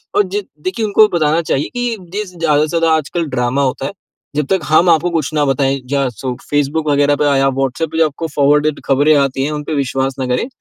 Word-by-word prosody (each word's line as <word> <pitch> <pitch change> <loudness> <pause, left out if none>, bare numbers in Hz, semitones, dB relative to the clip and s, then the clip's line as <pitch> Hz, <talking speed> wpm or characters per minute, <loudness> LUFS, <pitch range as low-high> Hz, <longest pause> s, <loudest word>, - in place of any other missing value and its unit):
और 205 - +5
जि 205 +2 -2 0.2
देखिए 215 +4 -2
उनको 210 +1 +5
बताना 160 0 +2
चाहिए 145 -3 -1
कि 245 -2 -1 0.2
जिस 200 -3 -5
ज़्यादा 150 -3 +2
से 155 - +1
ज़्यादा 165 -1 +3
आजकल 160 +2 -2
ड्रामा 125 +2 0
होता 135 0 -2
है, - - -3 0.4
जब 150 -2 0
तक 190 - +3
हम 165 +3 +4
आपको 170 +1 +3
कुछ 155 -2 -2
ना 150 -1 +2
बताएँ। 135 0 +1
जा 140 -1 0
सो 125 +3 -5 0.2
फेसबुक 145 +2 0
वगैरह 145 0 +3
पे 150 - -1
या 135 0 +3
व्हाट्सएप 135 +4 -2
पे 160 - -4
जो 165 - +4
आपको 160 +3 -5
फॉरवर्डेड 150 +1 +2
खबरें 145 +3 +3
आती 135 -1 +1
हैं, 150 - -1
उन 150 -1 -4
पे 155 - -4
विश्वास 135 -1 -1
ना 130 - -1
करें। 125 - -1
150 Hz, 230 wpm, -16 LUFS, 135-165 Hz, 0.4 s, और